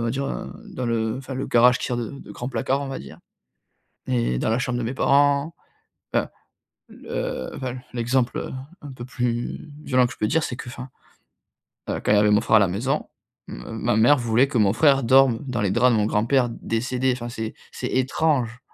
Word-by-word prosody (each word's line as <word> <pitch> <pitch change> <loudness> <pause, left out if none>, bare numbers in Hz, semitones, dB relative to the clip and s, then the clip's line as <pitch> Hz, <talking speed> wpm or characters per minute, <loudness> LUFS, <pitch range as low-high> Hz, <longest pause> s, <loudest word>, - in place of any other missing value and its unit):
va 115 - 0
dire, 135 +3 -2
heu, - - -5 0.2
dans 125 - -3
le 115 -1 0
enfin 135 0 -7
le 130 - -3
garage 125 +1 +5
qui - - -3
sert 125 - -2
de 115 -2 -3
de 140 - -11
grand 125 - -5
placard 135 +2 -1
on 140 - -4
va 135 - -4
dire. 70 - -11 0.9
Et 120 - 0
dans - - 0
la 115 - +1
chambre 125 -1 -1
de - - -2
mes 115 +4 -2
parents, 145 +4 +2 0.6
enfin - - +1 0.6
le - - -5
enfin 130 - -4
l 125 0 -9
l'exemple, 120 +1 0
heu, - - -5 0.3
un 145 -2 -8
peu 120 -2 -8
plus 125 +4 -3
violent 125 -3 +3
que - - -6
je - - -14
peux 105 - +1
dire 160 +7 +2
c'est 120 - -4
qu'enfin. 125 +1 -8 1.0
Heu, - - -1
quand - - +1
il - - +6
y - - +5
avait 105 0 +4
mon 105 - +4
frère 110 - +3
à - - +6
la 100 - +4
maison, 110 +9 -1 0.4
m - - -8 0.2
ma 120 -2 +1
mère 120 +7 +6
voulait 120 +2 +2
que 135 - -2
mon 100 -3 +4
frère 140 -3 +4
dorme 130 0 +5
dans 120 -4 -2
les 100 -2 +1
draps 125 +4 +4
de - - +3
mon 105 - +2
grand-père 120 +4 +2
décédé 125 +3 -1
enfin 120 -1 -5
c'est, 110 -1 -5 0.2
c'est - - -4
étrange. 130 -2 0
125 Hz, 220 wpm, -23 LUFS, 115-130 Hz, 1.0 s, il